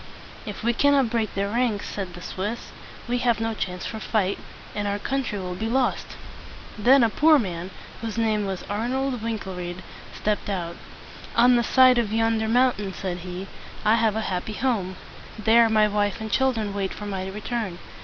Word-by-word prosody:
"If 210 Hz, -, -6 dB
we 235 Hz, +1 st, +2 dB
cannot 275 Hz, -2 st, +3 dB
break 225 Hz, -3 st, -1 dB
their 200 Hz, 0 st, 0 dB
ranks," 230 Hz, -2 st, 0 dB
said 185 Hz, -4 st, -5 dB
the 175 Hz, -, -9 dB
Swiss, 210 Hz, +5 st, -4 dB, 0.4 s
"we 245 Hz, +1 st, 0 dB
have 235 Hz, -3 st, +2 dB
no 225 Hz, 0 st, -1 dB
chance 180 Hz, -4 st, -4 dB
for 220 Hz, -, -4 dB
fight, 205 Hz, -3 st, 0 dB, 0.3 s
and 205 Hz, 0 st, -2 dB
our 200 Hz, 0 st, 0 dB
country 260 Hz, -1 st, -2 dB
will 180 Hz, -2 st, -4 dB
be 220 Hz, +5 st, -3 dB
lost!" 255 Hz, +1 st, 0 dB, 0.6 s
Then 255 Hz, +5 st, +5 dB
a 230 Hz, -, +4 dB
poor 305 Hz, +9 st, +6 dB
man, 180 Hz, -7 st, -3 dB, 0.3 s
whose 225 Hz, -1 st, -4 dB
name 215 Hz, -3 st, +1 dB
was 190 Hz, -2 st, -4 dB
Ar 215 Hz, +4 st, -2 dB
nold 265 Hz, -2 st, -1 dB
Wink´el 215 Hz, -4 st, -4 dB
ried, 175 Hz, +1 st, -6 dB, 0.3 s
stepped 210 Hz, -1 st, -2 dB
out. 170 Hz, -3 st, -3 dB, 0.6 s
"On 245 Hz, +1 st, +6 dB
the 240 Hz, -, +4 dB
side 255 Hz, +1 st, +6 dB
of 220 Hz, -3 st, -1 dB
yonder 225 Hz, 0 st, +1 dB
moun 250 Hz, +2 st, +4 dB
tain," 195 Hz, -2 st, -4 dB
said 185 Hz, -2 st, -4 dB
he, 180 Hz, +2 st, -6 dB, 0.4 s
"I 215 Hz, -, +5 dB
have 225 Hz, -2 st, +2 dB
a 220 Hz, -, 0 dB
happy 190 Hz, +1 st, -3 dB
home. 210 Hz, -6 st, -1 dB, 0.4 s
There 225 Hz, +1 st, +5 dB
my 215 Hz, -1 st, +4 dB
wife 205 Hz, -1 st, 0 dB
and 220 Hz, -1 st, -5 dB
chil 265 Hz, +3 st, +3 dB
dren 215 Hz, -4 st, -3 dB
wait 195 Hz, -1 st, -2 dB
for 210 Hz, -, -7 dB
my 190 Hz, -2 st, -3 dB
return. 210 Hz, -1 st, -3 dB
215 Hz, 195 wpm, -25 LUFS, 195-235 Hz, 0.6 s, poor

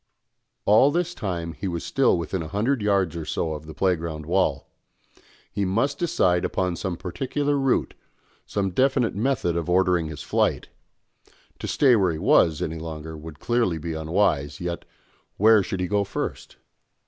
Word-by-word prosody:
All 110 Hz, +7 st, +6 dB
this 175 Hz, +3 st, -1 dB
time 85 Hz, -, -4 dB
he 95 Hz, -, -5 dB
was 85 Hz, -2 st, -3 dB
still 135 Hz, -8 st, +2 dB
within 85 Hz, +2 st, -3 dB
a 80 Hz, -, -5 dB
hundred 110 Hz, -, 0 dB
yards 100 Hz, -5 st, +1 dB
or 85 Hz, -, -4 dB
so 80 Hz, +1 st, -2 dB
of 75 Hz, 0 st, -8 dB
the 80 Hz, -, -8 dB
playground 85 Hz, -4 st, -1 dB
wall; 95 Hz, +4 st, 0 dB, 0.8 s
he 100 Hz, -, -1 dB
must 115 Hz, +10 st, 0 dB
decide 95 Hz, -, +2 dB
upon 90 Hz, -2 st, -1 dB
some 90 Hz, -1 st, -3 dB
particular 140 Hz, -, -2 dB
route, 135 Hz, -2 st, +1 dB, 0.5 s
some 100 Hz, -2 st, -1 dB
definite 130 Hz, +3 st, +2 dB
method 110 Hz, -6 st, 0 dB
of 85 Hz, 0 st, -2 dB
ordering 90 Hz, -2 st, +2 dB
his 75 Hz, -2 st, -7 dB
flight; -, -, 0 dB, 0.9 s
to -, -, -5 dB
stay 130 Hz, -4 st, +4 dB
where 95 Hz, -5 st, +2 dB
he 80 Hz, -, -4 dB
was 80 Hz, 0 st, +3 dB
any 80 Hz, +1 st, -4 dB
longer 80 Hz, 0 st, -7 dB
would 75 Hz, 0 st, -10 dB
clearly 120 Hz, -8 st, +1 dB
be 80 Hz, +1 st, -4 dB
unwise, 80 Hz, -3 st, 0 dB
yet, 85 Hz, -1 st, -4 dB, 0.5 s
where 110 Hz, +1 st, +6 dB
should 95 Hz, 0 st, -4 dB
he 90 Hz, -, 0 dB
go 100 Hz, +1 st, +1 dB
first? 100 Hz, +1 st, -5 dB
90 Hz, 165 wpm, -24 LUFS, 80-110 Hz, 0.9 s, All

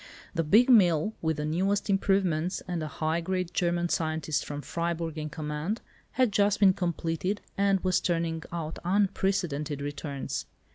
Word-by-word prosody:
The 165 Hz, -2 st, 0 dB
big 215 Hz, -, +5 dB
mill 190 Hz, -, +5 dB
with 160 Hz, -1 st, 0 dB
the 150 Hz, -, -2 dB
newest 190 Hz, +6 st, 0 dB
improvements, 190 Hz, -3 st, +1 dB
and 175 Hz, -2 st, -2 dB
a 155 Hz, -, -3 dB
high 160 Hz, +3 st, -1 dB
grade 180 Hz, 0 st, -2 dB
German 175 Hz, 0 st, +1 dB
scientist 155 Hz, -3 st, -1 dB
from 145 Hz, 0 st, -6 dB
Freiburg 170 Hz, +1 st, -2 dB
in 155 Hz, 0 st, -4 dB
command, 155 Hz, +8 st, -3 dB, 0.3 s
had 255 Hz, -3 st, +3 dB
just 205 Hz, +1 st, +2 dB
been 195 Hz, -2 st, +6 dB
completed 175 Hz, +2 st, -2 dB, 0.2 s
and 195 Hz, -1 st, +3 dB
was 185 Hz, -1 st, +2 dB
turning 165 Hz, -2 st, -1 dB
out 165 Hz, -2 st, -4 dB
unprecedented 180 Hz, -6 st, 0 dB
returns. 145 Hz, -1 st, -4 dB
170 Hz, 150 wpm, -28 LUFS, 155-195 Hz, 0.3 s, been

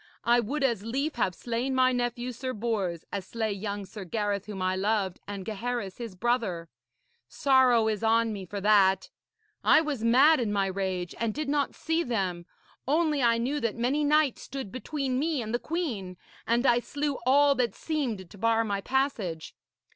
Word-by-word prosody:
I 240 Hz, +1 st, +4 dB
would 275 Hz, +6 st, -2 dB
as 235 Hz, -7 st, +1 dB
lief 270 Hz, +8 st, -2 dB
have 185 Hz, -6 st, 0 dB
slain 245 Hz, +3 st, -2 dB
my 255 Hz, 0 st, +4 dB
nephew, 245 Hz, 0 st, -2 dB
Sir 255 Hz, +2 st, -4 dB
Bors, 205 Hz, -7 st, -2 dB
as 200 Hz, -2 st, -3 dB
slay 220 Hz, +3 st, -3 dB
young 200 Hz, 0 st, -4 dB
Sir 205 Hz, +1 st, -8 dB
Gareth 205 Hz, +1 st, -2 dB
whom 205 Hz, -2 st, -6 dB
I 185 Hz, 0 st, 0 dB
loved, 195 Hz, -1 st, 0 dB
and 200 Hz, -2 st, -6 dB
Gaheris 225 Hz, -2 st, -3 dB
his 230 Hz, -5 st, -6 dB
brother. 195 Hz, -7 st, -1 dB, 0.6 s
Sorrow 255 Hz, -5 st, +4 dB
is 215 Hz, -2 st, -1 dB
on 225 Hz, 0 st, +3 dB
me 200 Hz, -2 st, -6 dB
for 200 Hz, +3 st, -5 dB
that! 195 Hz, -2 st, +4 dB, 0.5 s
I -, -, +6 dB
was 295 Hz, -7 st, -2 dB
mad 265 Hz, +7 st, +6 dB
in 225 Hz, -4 st, -1 dB
my 200 Hz, -1 st, +1 dB
rage 190 Hz, -2 st, -3 dB
and 230 Hz, -2 st, -1 dB
did 305 Hz, -1 st, -3 dB
not 285 Hz, -1 st, 0 dB
see 325 Hz, +1 st, 0 dB
them. 190 Hz, -, -2 dB, 0.4 s
Only 305 Hz, 0 st, +2 dB
I 235 Hz, -1 st, +4 dB
knew 265 Hz, +6 st, -1 dB
that 230 Hz, -5 st, -1 dB
many 260 Hz, +6 st, 0 dB
knights 295 Hz, -2 st, +2 dB
stood 265 Hz, -6 st, -6 dB
between 260 Hz, 0 st, -2 dB
me 310 Hz, 0 st, 0 dB
and 220 Hz, -1 st, -4 dB
the 240 Hz, -, +1 dB
queen, 235 Hz, -, -3 dB, 0.3 s
and 235 Hz, +3 st, +2 dB
I 240 Hz, -2 st, +5 dB
slew 285 Hz, +3 st, -3 dB
all 285 Hz, +2 st, +5 dB
that 245 Hz, -6 st, -1 dB
seemed 250 Hz, -, -3 dB
to 200 Hz, -, -15 dB
bar 225 Hz, +1 st, +3 dB
my 200 Hz, -2 st, -2 dB
passage.' 215 Hz, -, -1 dB
230 Hz, 185 wpm, -28 LUFS, 200-265 Hz, 0.6 s, I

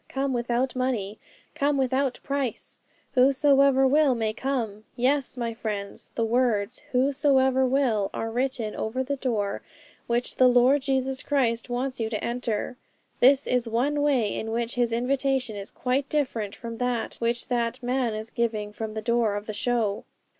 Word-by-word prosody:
Come 270 Hz, 0 st, -1 dB
without 240 Hz, +1 st, -1 dB
money! 230 Hz, -5 st, -2 dB, 0.3 s
Come 290 Hz, -1 st, +1 dB
without 265 Hz, 0 st, 0 dB
price! 275 Hz, -4 st, -3 dB, 0.3 s
Whosoever 275 Hz, 0 st, +5 dB
will 280 Hz, -1 st, +4 dB
may 220 Hz, -2 st, -1 dB
come!" 225 Hz, -5 st, -3 dB
Yes, 260 Hz, +1 st, +1 dB
my 235 Hz, -1 st, -2 dB
friends, 210 Hz, -3 st, -5 dB
the 230 Hz, -, +1 dB
words 230 Hz, -2 st, +1 dB
"Whosoever 265 Hz, 0 st, +3 dB
will" 250 Hz, -7 st, +1 dB
are 225 Hz, -, -4 dB
written 245 Hz, -3 st, -2 dB
over 250 Hz, +4 st, -2 dB
the 280 Hz, +2 st, -3 dB
door 220 Hz, -7 st, -1 dB, 0.5 s
which 240 Hz, +1 st, -1 dB
the 255 Hz, -, +6 dB
Lord 250 Hz, +3 st, +5 dB
Jesus 265 Hz, -1 st, -1 dB
Christ 245 Hz, -5 st, 0 dB
wants 255 Hz, +2 st, -2 dB
you 225 Hz, -1 st, -1 dB
to 215 Hz, -2 st, -3 dB
enter. 240 Hz, 0 st, -2 dB, 0.4 s
This 270 Hz, +2 st, +5 dB
is 250 Hz, -2 st, +1 dB
one 280 Hz, +6 st, 0 dB
way 260 Hz, -8 st, +2 dB
in 225 Hz, -, -4 dB
which 235 Hz, +1 st, -2 dB
His 240 Hz, -1 st, +1 dB
invitation 255 Hz, 0 st, 0 dB
is 200 Hz, 0 st, -4 dB
quite 265 Hz, +2 st, -1 dB
different 235 Hz, -9 st, -1 dB
from 230 Hz, -1 st, -7 dB
that 245 Hz, -2 st, -1 dB
which 235 Hz, 0 st, -1 dB
that 240 Hz, 0 st, -1 dB
man 245 Hz, -2 st, 0 dB
is 215 Hz, +1 st, -5 dB
giving 220 Hz, -3 st, -1 dB
from 220 Hz, 0 st, -5 dB
the 220 Hz, -, -4 dB
door 235 Hz, -3 st, +1 dB
of 205 Hz, 0 st, -4 dB
the 215 Hz, -, -5 dB
show. 220 Hz, -2 st, 0 dB
245 Hz, 160 wpm, -26 LUFS, 225-265 Hz, 0.5 s, the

